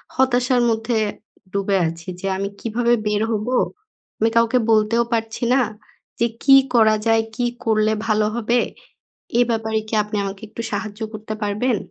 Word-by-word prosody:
হতাশার 250 -1 +2
মধ্যে 225 +1 0 0.5
ডুবে 200 0 +1
আছি 165 0 -7
যে 195 - -4
আমি 200 +1 -2
কীভাবে 235 +1 +1
বের 210 0 +1
হবো? 220 +3 -1 0.7
আমি 225 - +3
কাউকে 230 +2 +4
বলতেও 220 +2 +3
পারছি 225 0 -2
না 265 - +4 0.6
যে 235 - +3 0.2
কী 270 -1 +7 0.2
করা 220 -2 +5
যায়, 225 0 +3
কী 245 0 0 0.2
করলে 215 -1 +2 0.2
ভালো 215 -1 +2
হবে? 235 +1 +1 0.8
এ - - +6
ব্যাপারে 220 -1 0
কি 220 - -10
আপনি 210 +1 -6
আমাকে 195 0 -5
একটু 220 +2 -7
সাহায্য 205 0 -4
করতে 215 0 -6
পারবেন? 210 +3 0
220 Hz, 155 wpm, -21 LUFS, 210-235 Hz, 0.8 s, কী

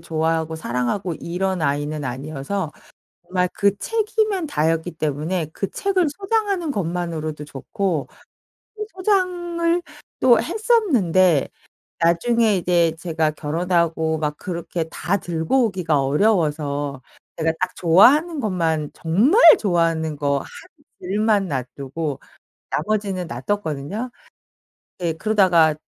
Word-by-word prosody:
좋아하고 160 0 -1
사랑하고 160 +7 -2
이런 180 +1 -2
아이는 145 +1 -1
아니어서 150 +7 -4 0.5
정말 180 +1 0
그 200 0 +1
책이면 430 - 0
다였기 165 - 0
때문에 155 +2 -2
그 195 - -3
책을 380 -4 +1
소장하는 390 0 -1
것만으로도 165 - -3
좋고 150 +3 -3 0.7
또 425 0 -4
소장을 355 -3 0 0.4
또 240 -3 +5
했었는데 250 - +2 0.5
나중에 215 +6 +3
이제 170 -2 +2
제가 160 -3 0
결혼하고 160 0 0
막 150 -1 -2
그렇게 170 -2 -4
다 185 +5 -1
들고 175 +9 0
오기가 175 -7 0
어려워서 145 -4 0 0.4
제가 160 0 +1
딱 180 0 -2
좋아하는 285 - +5
것만 165 - -1
정말 220 - +3 0.2
좋아하는 165 -5 0
거 140 -1 0
1 - - -9 0.6
질만 205 +1 +1
놔 135 -6 -2
두고 140 +1 -4 0.5
나머지는 195 0 -1
놔 120 -3 -6
뒀거든요. 205 - -3 0.9
네 170 -2 -1
그러다가 175 -5 +3
175 Hz, 260 characters per minute, -21 LUFS, 155-215 Hz, 0.9 s, 또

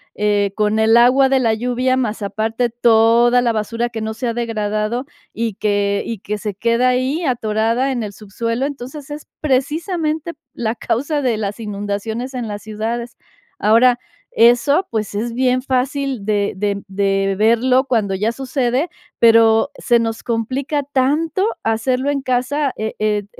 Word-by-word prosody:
eh, 205 -1 +1
con 215 0 +1
el 220 +1 +4
agua 250 +3 +5
de 265 0 +2
la 230 -3 +2
lluvia, 250 +3 0
más 225 -4 -2
aparte 220 +4 -1
toda 235 +1 +4
la 240 -1 +2
basura 230 +2 -2
que 230 -1 -6
no 220 0 -3
se 225 +3 -4
ha 230 - -1
degradado, 225 +1 -2 0.3
y 225 -3 -2
que 205 -1 0
y 230 -3 -5
que 210 +2 -4
se 210 0 -4
queda 235 +5 +1
ahí 260 +7 0
atorada 230 +1 0
en 250 -3 -2
el 210 -2 -5
subsuelo. 230 +5 -3
Entonces, 280 +1 -7
es 295 0 -7
precisamente 310 +3 -1 0.2
la 225 -1 -2
causa 285 +7 -1
de 250 -4 +1
las 210 0 -4
inundaciones 210 +4 -4
en 245 -3 -4
las 205 -1 -5
ciudades. 225 +3 -4 0.4
Ahora, 240 +4 +4 0.3
eso, 245 +10 +4
pues, 215 -3 -3
es 230 +3 -2
bien 255 +1 +1
fácil 265 -2 -1
de 205 -1 0
de 200 0 -2
de 195 0 0
verlo 235 +4 +3
cuando 205 -5 0
ya 215 +4 0
sucede, 260 +2 -1 0.3
pero 225 +1 +5
se 240 -1 +2
nos 225 0 -3
complica 260 +6 -2
tanto 290 +7 0 0.2
hacerlo 250 +5 0
en 285 -1 -1
casa, 265 +3 0
e 220 0 -3
e 210 -1 0
235 Hz, 160 wpm, -19 LUFS, 215-260 Hz, 0.4 s, agua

